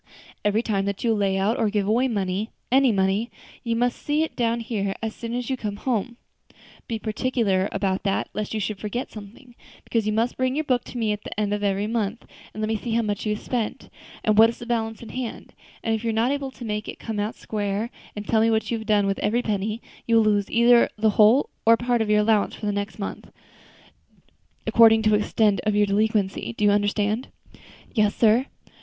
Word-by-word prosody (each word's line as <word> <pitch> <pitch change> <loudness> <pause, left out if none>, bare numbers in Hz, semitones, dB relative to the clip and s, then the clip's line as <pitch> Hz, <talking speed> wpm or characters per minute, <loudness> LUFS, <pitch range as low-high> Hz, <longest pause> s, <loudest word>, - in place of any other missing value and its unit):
Every 210 +2 +2
time 195 -4 0
that 200 -1 -3
you 230 -2 +3
lay 200 -2 +1
out 210 +6 +1
or 220 -2 +2
give 205 -1 0
away 235 +5 +3 0.7
any 265 -1 +5
money, 195 +3 +1 0.3
you 230 -2 -1
must 245 +1 0
set 295 - -3
it 315 0 0
down 235 -1 0
here 200 -4 -2
as 220 -1 -2
soon 230 0 -5
as 245 -1 -3
you 265 - 0
come 210 -5 -4
home; 240 +1 -2 0.7
be 230 - -2
particular 215 -3 0
about 195 -1 -1
that, 195 -1 -1
lest 210 -1 -3
you - - 0
should 210 0 -3
forget 230 +4 -4
something, 220 +4 -12 0.3
because 225 -2 -1
you - - +2
must 230 +3 0
bring 255 0 0
your 310 - 0
book 255 -4 +1
to - - -8
me 225 -3 0
at 210 0 -4
the - - -6
end 205 -1 0
of 205 - -2
every 200 0 +1
month, 220 0 -2 0.3
and 215 - -7
let - - 0
me 220 0 0
see 230 +2 -4
how 230 0 +2
much 210 0 -2
you 210 - +1
have - - -10
spent, 235 -4 -3 0.3
and 215 -1 +3
what 225 +1 +8
is 230 - -6
the 240 - -9
balance 225 -2 -2
in 230 - -10
hand; 250 -3 -6 0.3
and 225 - 0
if 220 0 -2
you 230 - 0
are - - 0
not 230 +4 +2
able 280 -1 -2
to 260 -2 -10
make 210 -1 -3
it - - -7
come 220 -2 -5
out 210 +2 -2
square, 210 +1 -3 0.2
and 205 0 -6
tell 220 -1 +3
me 225 - +4
what 220 +1 0
you 230 - 0
have 220 - -9
done 210 -2 +3
with 195 0 -1
every 235 +4 +1
penny, 215 +2 -2 0.2
you 230 - +3
will 225 - +6
lose 205 -2 +1
either 235 +1 +5
the 215 0 +3
whole 220 +7 +4
or 230 - +6
a - - +4
part 240 -1 0
of 220 - -1
your 210 0 +4
allowance 210 -1 +2
for - - -7
the 205 - +1
next 205 +1 -4
month, 200 - -6 1.4
according 225 -1 +6
to 215 - +3
the 210 - +5
extent 210 -1 +1
of 215 -1 +1
your 205 0 +4
delinquency. 205 +1 0
Do 210 - +1
you 205 - +5
understand?" 205 +3 0 0.7
"Yes, 210 -3 +2
sir." 235 +4 +3
220 Hz, 235 wpm, -24 LUFS, 205-235 Hz, 1.4 s, what